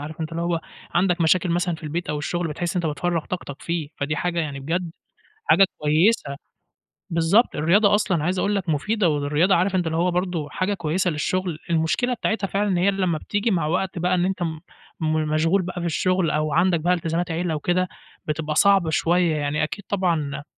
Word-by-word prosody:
عارف 155 +2 -8
أنت 160 0 -3
اللي 165 +1 -2
هو 170 -1 0 0.3
عندَك 180 0 +2
مشاكل 170 +2 +3
مثلًا 175 0 0
في 160 - -12
البيت 155 +1 -3
أو 150 - -2
الشغل، 175 +3 -2
بتحس 170 +3 -3
إن 180 - +1
أنت 160 -3 0
بتفرغ 170 +1 -1
طاقتَك 160 -6 -6
فيه. 170 -3 -2
فدي 145 +2 -2
حاجة 175 +1 -1
يعني 145 -4 -4
بجد 170 +5 -2 0.5
حاجة 195 - +5
كويسة، 150 0 +2 0.7
بالضبط، 170 +8 +3
الرياضة 200 +7 +4
أصلًا 190 -7 0
عايز 180 +3 0
أقول 205 +2 +1
لَك 185 -3 -2
مفيدة، 185 +5 +1
والرياضة 150 +5 +2
عارف 185 +3 +1
أنت 180 -2 +1
اللي 160 0 -1
هو 180 +2 +2
برضه 175 -4 -2
حاجة 185 +6 -1
كويسة 180 0 0
للشغل، 175 +1 -2
المشكلة 170 +10 +1
بتاعتها 220 -3 -1
فعلًا 200 +2 0
إن 185 - +1
هي 185 +3 +3
لما 185 -4 0
بتيجي 205 +8 -1
مع 170 -5 +1
وقت 185 +2 -1
بقى 180 +2 +1
إن 180 0 +1
أنت 190 -1 -1
م 160 -2 -3 0.4
م 155 -1 0
مشغول 165 +5 +2
بقى 180 0 -5
في 175 - -3
الشغل، 180 +1 +1
أو 155 -1 0
عندَك 175 +1 +3
بقى 175 +3 +2
التزامات 170 0 -1
عيلة 165 0 -1
وكده، 175 +4 0 0.4
بتبقى 150 0 -2
صعبة 195 -2 +4
شوية، 170 +1 +2
يعني 150 0 -1
أكيد 180 +6 -4
طبعًا 165 -8 -1
170 Hz, 200 wpm, -23 LUFS, 155-185 Hz, 0.7 s, حاجة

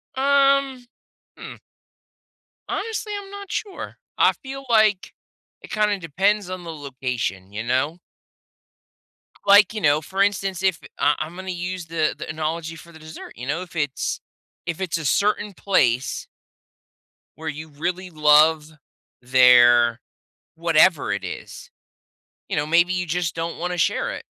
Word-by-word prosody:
Um, 275 -1 +2 0.5
Hm. - - -9 1.1
Honestly, 425 0 -3
I'm 390 - -13
not 400 -1 -9
sure. 400 -3 -5 0.2
I - - +5
feel 270 0 -9
like 215 -4 +3 0.5
it - - -13
kinda 210 -1 +1
depends 190 +5 0
on 185 -1 -6
the 165 -1 -7
location, 125 - -4
you 105 +2 -5
know? 130 +8 -1 1.4
Like, 205 +2 +6
you 215 - -4
know, 150 -1 +3
for 190 +5 -3
instance, 195 -2 -1
if 185 -4 +1 0.2
I 145 +1 +3
Imma 175 +3 -9
use 180 0 -4
the 160 -1 0
the - - -6
analogy 160 +1 -4
for 170 +1 -14
the 160 - -14
dessert, 155 0 -11
you 125 +2 -8
know? 155 +5 -1
If 180 -1 -11
it's 145 -4 -2 0.5
if 165 0 -4
it's 180 -3 -1
a 160 - -6
certain 205 +6 +1
place 130 -11 0 1.1
where 160 0 -5
you 155 +2 -7
really 175 +5 -4
love 155 0 +4 0.5
their 120 -2 +5 0.6
whatever 165 0 +3
it - - -2
is. - - -8 0.8
You - - -2
know, 145 - 0
maybe 170 +3 +3
you 180 0 -1
just 170 0 -2
don't 165 0 -4
wanna 180 +1 -3
share 170 - 0
it. - - -8
170 Hz, 145 wpm, -22 LUFS, 150-195 Hz, 1.4 s, Like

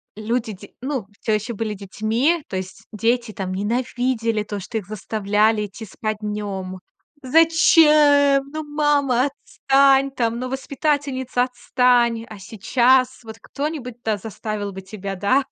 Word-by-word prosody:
люди 225 0 -2
дь 200 +2 -12
ну, 260 -6 -3
всё 220 - 0
еще 220 +3 -2
были 215 0 -3
детьми, 225 - -1
то 190 - -6
есть 185 0 -7
дети 230 +2 0
там 185 -2 -5
ненавидели 230 +1 -1
то, 205 -1 -5
что 225 +4 -5
их 200 -3 -6
заставляли 210 +1 0
идти 205 +3 -9
спать 215 +1 -4
днем: 200 -3 -4 0.4
"Зачем? 300 -2 +5
Ну, 310 - -4
мама, 290 -4 +1
отстань 275 -1 +2
там, 235 -2 -1
ну, 255 0 -4
воспитательница, 265 -2 -1
отстань!" 245 -2 +1
А 215 - -9
сейчас 250 +5 +1
вот 220 0 -10
кто-нибудь, 280 -5 -5
да, 215 -2 0
заставил 215 -1 -5
бы 190 0 -8
тебя, 195 0 -6
да, 255 +9 +2
235 Hz, 140 wpm, -21 LUFS, 210-270 Hz, 0.4 s, Зачем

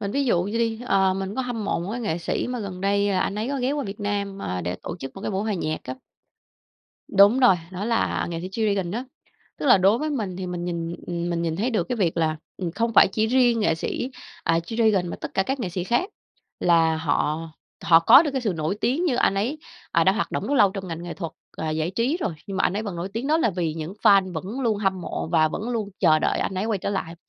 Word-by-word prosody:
mình 200 -1 -3
ví 280 +4 0
dụ 180 -8 +2
vậy 205 +3 -4
đi, 230 0 0
ờ, 190 -2 +3
mình 195 +1 -4
có 260 - -1
hâm 235 -4 -4
mộ - - 0
một 180 - -4
cái 245 - -3
nghệ 190 -8 -1
sĩ 170 - -2
mà 250 -2 -3
gần 185 -3 -6
đây 200 +1 +2
là 190 - +1
anh 200 - -1
ấy 220 +4 -2
có 280 - -1
ghé 255 +2 0
qua 290 -2 -2
Việt 200 +2 -7
Nam, 200 -1 -2
ờ, 90 - -3
để 90 +2 -3
tổ - - -5
chức 135 -5 -8
một 195 - -9
cái - - -3
buổi 195 +1 -1
hòa 215 - -1
nhạc 155 -3 -2
á. 130 - -5 1.2
Đúng 205 +6 +7
rồi, 240 -8 +6
đó 190 +2 -5
là 230 0 0
nghệ 165 - -4
sĩ 185 - -5
G-Dragon 200 -3 -1
á. 240 +3 -3 0.5
Tức - - -3
là 245 - +7
đối 200 +5 +4
với 310 0 -2
mình 210 -10 -3
thì 185 0 -4
mình 175 -1 -4
nhìn, 170 -1 -3
ừm, 175 0 -3
mình 170 0 -1
nhìn 165 -1 -1
thấy 235 +6 0
được 220 - 0
cái 250 - -1
việc 175 -6 0
là, 155 -1 +1 0.2
ừm, 175 -3 -3
không 230 +4 -1
phải - - +7
chỉ 220 0 +1
riêng 240 -2 +3
nghệ 165 -5 +2
sĩ, 245 +10 -3 0.3
à, 165 - +3
G-Dragon 205 0 +1
mà - - -5
tất - - -7
cả 195 - +3
các 265 +5 -3
nghệ 205 - -2
sĩ 175 0 -3
khác, 240 - 0 0.5
là 165 -2 +4
họ 160 +1 -1 0.3
họ 165 -1 +7
có 265 - +8
được 300 - -1
cái 270 - -2
sự 215 -6 0
nổi 160 +4 -2
tiếng 280 +9 +1
như 270 -9 +1
anh 195 - +3
ấy, 240 +10 -1 0.3
à, - - +3
đã - - +5
hoạt - - -2
động - - -3
rất 285 - 0
lâu 205 -7 +5
trong 190 -2 -6
ngành 165 +1 -5
nghệ 175 - -6
thuật 165 -4 -5 0.2
và 160 -1 -3
giải 155 +2 -1
trí 235 - 0
rồi, 180 - -2
nhưng 195 -1 -5
mà - - +2
anh - - +2
ấy 215 - -1
vẫn 200 -5 -5
nổi 170 +3 -4
tiếng 235 +5 -3
đó 315 +2 +3
là 230 - +2
vì 170 -4 -2
những 160 +2 -5
fan 195 -2 +5
vẫn 190 +10 -5
luôn 230 -5 +1
hâm 190 -2 0
mộ 170 - -4
và 155 -2 +4
vẫn 215 +8 -4
luôn 220 -4 -2
chờ 155 -4 +5
đợi - - 0
anh - - -2
ấy 185 +2 -1
quay 220 -2 0
trở 195 - -3
lại. 170 -4 -3
195 Hz, 280 wpm, -24 LUFS, 170-230 Hz, 1.2 s, có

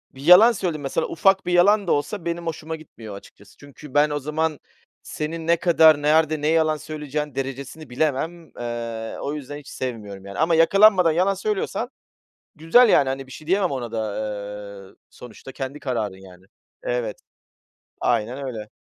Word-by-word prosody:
bir 135 - -11
yalan 180 +9 +8
söyledin 180 -8 -3
mesela, 135 - -2
ufak 195 +3 +2
bir 180 - -1
yalan 200 +3 +4
da - - +1
olsa 160 +6 -1
benim 170 0 -3
hoşuma 160 0 -4
gitmiyor 115 -9 -11
açıkçası. 100 0 -16
Çünkü 145 -1 -14
ben 145 +1 +4
o 145 0 -2
zaman 150 +1 -2 0.4
senin 160 +1 -5
ne 170 0 +4
kadar, 160 -3 +5
nerede, 155 0 +2
ne 150 - 0
yalan 155 -1 +2
söyleyeceğinin 150 -2 -5
derecesini 135 +2 -6
bilemem. 155 +5 -2
Eee, 115 -1 -5
o 145 - -3
yüzden 145 -1 -7
hiç 145 -2 -13
sevmiyorum 105 -6 -6
yani. 100 0 -8
Ama 165 +2 +3
yakalanmadan 185 +1 +5
yalan 185 +5 +2
söylüyorsan 210 +4 -2 0.7
güzel, 170 +11 +5
yani, 140 -9 +4
hani, 135 0 -4
bir 130 - -13
şey 155 - -11
diyemem 190 0 +2
ona 125 -4 -4
da. 110 -2 -3 0.8
Eee, - - -23 0.2
sonuçta 125 +2 -12
kendi 135 +2 -6
kararın 110 -7 -3
yani. 90 +1 -17 0.4
Evet. 120 -4 -3 0.8
Aynen 125 +6 -1
öyle. 110 -4 -6
150 Hz, 165 wpm, -23 LUFS, 130-165 Hz, 0.8 s, yalan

